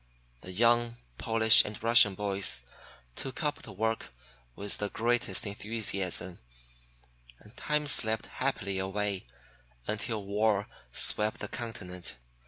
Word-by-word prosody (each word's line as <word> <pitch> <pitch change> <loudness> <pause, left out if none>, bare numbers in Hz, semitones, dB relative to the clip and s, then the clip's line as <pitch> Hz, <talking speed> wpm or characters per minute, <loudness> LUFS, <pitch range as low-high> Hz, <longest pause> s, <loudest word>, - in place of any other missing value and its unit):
The 95 - -8
young 120 +3 +3 0.2
Polish 110 0 +7
and 105 - -6
Russian 115 -4 +6
boys 100 -9 +1 0.5
took 135 +5 -5
up 145 -1 -1
the 110 - -10
work 110 +3 -2 0.4
with 100 0 -2
the 105 - -2
greatest 115 -4 0
enthusiasm, 100 -4 -2 1.0
and 105 - -18
time 150 0 -1
slipped 110 -6 +1
happily 95 -1 -2
away, 95 -3 -2 0.6
until 110 0 -3
war 105 0 +1 0.2
swept 105 0 +1
the - - -4
continent. 90 -7 -7
105 Hz, 115 wpm, -30 LUFS, 100-115 Hz, 1.0 s, Polish